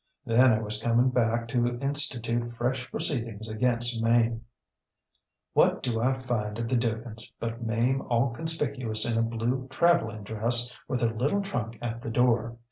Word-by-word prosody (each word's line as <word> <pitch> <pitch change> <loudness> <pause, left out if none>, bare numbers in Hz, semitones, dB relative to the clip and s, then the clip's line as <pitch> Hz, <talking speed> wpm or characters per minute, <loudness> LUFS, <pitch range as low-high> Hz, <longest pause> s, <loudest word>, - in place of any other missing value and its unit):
Then 125 +2 +5
I 110 - +2
was 105 0 -4
coming 120 +2 +2
back 115 -1 0
to 120 0 0
institute 120 -4 -1
fresh 130 +2 -2
proceedings 115 -9 -3
against 115 +1 0
Mame. 115 0 +2 1.1
ŌĆ£What - - +3
do 115 -2 -1
I 130 +2 +1
find 115 -5 -3
at 115 0 -3
the 130 - 0
DugansŌĆÖ 115 -1 -3
but 115 +1 -5
Mame 120 +4 0
all 120 +1 +1
conspicuous 130 -6 +1
in 115 -1 +1
a 115 - -2
blue 120 +3 -2
travelling 130 -8 +1
dress, 115 +3 +4
with 125 - -2
her 115 -1 +1
little 145 - 0
trunk 120 - -4
at 115 0 -4
the 115 - -5
door. 115 0 +1
120 Hz, 160 wpm, -27 LUFS, 115-125 Hz, 1.1 s, Then